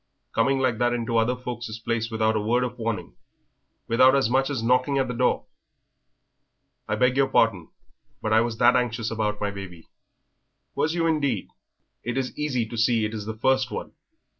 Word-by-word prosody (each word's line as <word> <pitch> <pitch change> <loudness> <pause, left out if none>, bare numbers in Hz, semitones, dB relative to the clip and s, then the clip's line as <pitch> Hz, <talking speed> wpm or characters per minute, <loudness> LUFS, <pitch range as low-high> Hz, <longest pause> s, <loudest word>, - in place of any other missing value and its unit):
"Coming 135 +4 +2
like 130 -4 0
that 120 0 +2
into 115 -1 -1
other 115 +3 +2
folk's 120 -3 -6
places 115 0 -2
without 110 0 +1
a - - +1
word 120 +4 +1
of 125 0 -5
warning 115 - -3 0.7
without 130 +3 +5
as 135 -4 +2
much 135 +2 +2
as 135 -6 -2
knocking 125 +3 +2
at 135 -1 +1
the 125 - -3
door." 125 +1 +1 1.4
"I - - 0
beg 125 0 +2
your 135 0 +3
pardon, 115 -10 +2 0.5
but 110 - -1
I 110 - +6
was 115 -1 -2
that 120 +2 +5
anxious 115 -2 0
about 105 -2 -1
my 105 -1 -1
baby." 95 -4 -10 0.8
"Was 160 +2 0
you 165 -1 +1
indeed? 145 - 0 0.5
It 120 +2 -3
is 130 -1 -2
easy 135 -6 -1
to 115 +1 -8
see 115 -1 +3
it 105 - -4
is 105 -1 -5
the 110 0 -5
first 130 +2 +2
one. - - -6
120 Hz, 190 wpm, -25 LUFS, 110-130 Hz, 1.4 s, I